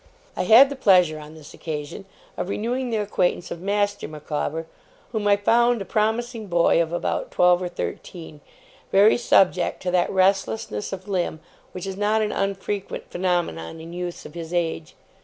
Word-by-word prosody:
I - - -1
had 245 +5 +8
the - - -3
pleasure, 180 - +4
on 150 +1 -11
this 155 -2 -13
occasion, 150 +4 -6 0.3
of 180 - -4
renewing 245 +5 -2
the 225 - 0
acquaintance 190 -4 -1
of 170 - -6
Master 205 +1 -1
Micawber, 155 +1 -4 0.5
whom 215 -3 -1
I 200 0 +5
found 235 +3 +3
a 195 - -5
promising 220 +2 -1
boy 170 -1 +3
of 165 -1 -2
about 175 - -2
twelve 180 0 +3
or 180 - -3
thirteen, 155 - -7 0.5
very 200 +3 +6
subject 190 -6 +2
to 180 - -1
that 180 -1 +2
restlessness 185 - 0
of 190 0 -7
limb 180 -5 -2 0.3
which 180 0 -7
is 195 -1 -5
not 215 +2 +1
an 210 - -1
unfrequent 195 0 -3
phenomenon 175 - -2
in 165 +1 -9
youths 175 0 -5
of - - -10
his 165 -1 -7
age. 165 -2 -2
185 Hz, 170 wpm, -23 LUFS, 165-205 Hz, 0.5 s, had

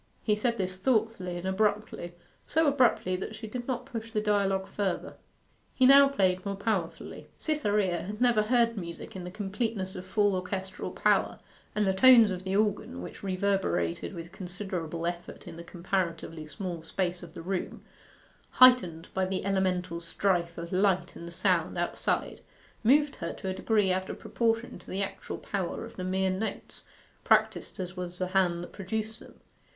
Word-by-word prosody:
He 210 - +2
said 235 +2 0
this 185 -2 -2
thoughtfully 215 -5 0
and 175 - -6
abruptly 200 -3 -1 0.3
so 320 +1 +2
abruptly 255 -10 +3
that 210 +3 -5
she 220 - -8
did 240 +3 -6
not 250 -2 -2
push 230 -4 -6
the 215 - 0
dialogue 200 -2 +1
further. 195 -3 -2 0.6
He 260 - +4
now 275 +1 +9
played 185 -8 +1
more 200 -1 -3
powerfully. 200 -4 -3
Cytherea 205 - 0
had 210 +3 -6
never 240 -3 +4
heard 230 +1 +2
music 170 -1 -7
in 180 -2 -6
the - - -5
completeness 205 0 -3
of 185 - -6
full 205 +1 +2
orchestral 190 +1 -4
power, - - +2 0.4
and 210 -1 +2
the 190 - +2
tones 230 0 +7
of 185 0 -4
the 190 0 -1
organ, 205 - 0
which - - -9
reverberated 190 - -1
with 170 0 -8
considerable 180 -3 -4
effect 175 0 -5
in - - -8
the 170 - -8
comparatively 170 -3 -3
small 175 0 -5
space 175 +2 -2
of 170 -1 -11
the - - -7
room, 185 +1 -3 0.7
heightened 195 -11 +6
by 190 0 +1
the 185 0 -3
elemental 185 -3 0
strife 170 0 0
of 170 0 -6
light 185 -2 +2
and 170 0 -8
sound 170 - +1
outside, - - -1 0.4
moved 285 +5 +4
her 170 - -4
to 190 - -5
a - - -1
degree 205 -1 +2
out 185 0 -2
of - - -5
proportion 230 -3 -1
to - - -15
the 195 +2 -1
actual 195 0 -6
power 190 -4 -3
of - - -12
the 185 - -5
mere 190 +1 +1
notes, 195 +4 -5 0.4
practised - - +2
as 180 -1 -5
was 180 -1 -5
the 185 0 -2
hand 180 -2 +2
that - - -9
produced 220 +3 -4
them. - - -15
190 Hz, 175 wpm, -29 LUFS, 180-215 Hz, 0.7 s, now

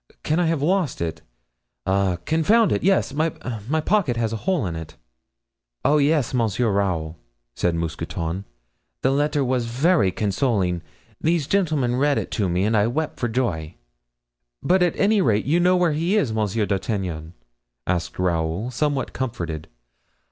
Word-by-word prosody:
Can 155 +3 +1
I 175 - +2
have 160 -3 0
lost 180 -3 +1
it? 85 -1 -3 0.6
Ah! 95 -1 +1
confound 200 +8 +3
it! - - +1
yes, 190 -7 +2
my 155 +3 +1
pocket 155 - -1
has 115 -1 0
a 115 - -3
hole 180 - +1
in 85 -3 -3
it." 80 -1 -8 0.9
"Oh, 150 +2 +4
yes, 145 -3 +2
Monsieur 115 -1 +1
Raoul!" 85 -5 -1 0.3
said 85 +6 0
Mousqueton, 85 +2 -3 0.6
"the 130 - +3
letter 145 0 +1
was 125 -2 0
very 135 - +3
consoling. 95 -4 0 0.4
These 165 -2 +1
gentlemen 150 -9 +1
read 145 +1 +2
it - - -3
to 100 -4 0
me 90 +2 +1
and 110 +1 +1
I 105 0 +3
wept 155 +6 -2
for 120 - 0
joy." 95 -10 -2 0.9
"But 185 +1 +3
at 175 -1 +2
any 205 +1 +3
rate, 110 - +2
you 160 +6 +2
know 180 +1 +4
where 175 -3 +2
he 170 +7 +1
is, 135 - +1
Monsieur 110 0 0
d'Artagnan?" 95 -5 -3 0.5
asked 90 -2 -2
Raoul, 85 +5 -1
somewhat 140 +1 -1
comforted. 85 - -4
120 Hz, 155 wpm, -23 LUFS, 95-155 Hz, 0.9 s, Oh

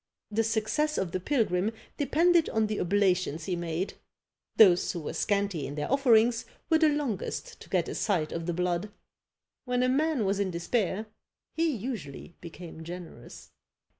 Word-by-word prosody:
The 225 +2 +2
success 225 +7 0
of 190 -3 -1
the 185 - -1
pilgrim 210 -3 +1 0.2
depended 330 +4 +3
on 220 0 +1
the 215 0 -2
oblations 180 -4 +1
he 185 - -1
made; 170 +2 -3 0.6
those 185 -5 +6
who 170 - -5
were 150 - -5
scanty 200 -7 0
in 145 - -6
their 150 - -3
offerings 235 -4 +4 0.3
were 320 - +5
the 315 -1 +5
longest 285 -10 -3
to - - -12
get - - +1
a - - -4
sight 175 -7 0
of 165 0 -4
the 175 - 0
blood: 180 +3 -1 0.8
when 250 0 +1
a 255 - +2
man 290 -3 +1
was 195 +1 0
in 200 -2 +1
despair, 190 +4 -1 0.5
he 330 0 +1
usually 205 - -5
became 165 -1 -9
generous! 175 +1 -10
205 Hz, 165 wpm, -29 LUFS, 175-245 Hz, 0.8 s, those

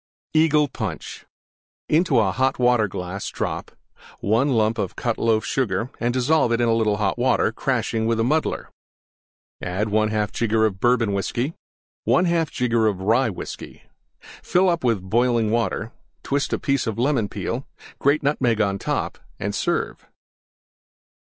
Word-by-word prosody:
EAGLE 155 -2 +4
PUNCH 100 - -6 0.6
Into 160 -4 +3
a 105 -4 +3
Hot 130 +6 +1
Water 120 -3 +3
glass 90 +1 -5
drop: - - -4 0.5
1 115 +7 +2
lump 110 -3 +1 0.2
Cut 120 -2 -2
Loaf 110 -1 +2
Sugar 115 -2 -1
and 120 +1 +1
dissolve 130 +1 +2
in 115 - +2
little 115 -3 +2
Hot 105 +2 -1
Water, 125 -3 +2
crashing 115 -2 -1
with 115 -1 +1
muddler. 150 +8 0 0.9
1/2 105 +2 0
jigger 110 -1 +2
Bourbon 115 +2 +1
Whiskey. 120 +9 -1 0.5
1/2 170 -3 +2
jigger 115 -3 +1
Rye 110 +6 +1
Whiskey. 95 - -8 0.6
Fill 185 +1 +2
up 170 -4 0
with 110 -7 0
boiling 115 0 +2
Water; 115 -1 -1 0.3
twist 140 0 -1
a - - +1
piece 140 -3 0
of 110 - -2
Lemon 120 -4 +1
Peel - - -3 0.2
and - - -19
grate 145 +2 +2
Nutmeg 125 -6 +1
on 100 -2 +1
top - - -2 0.2
and - - -3
serve. - - -2
115 Hz, 135 wpm, -23 LUFS, 110-130 Hz, 0.9 s, EAGLE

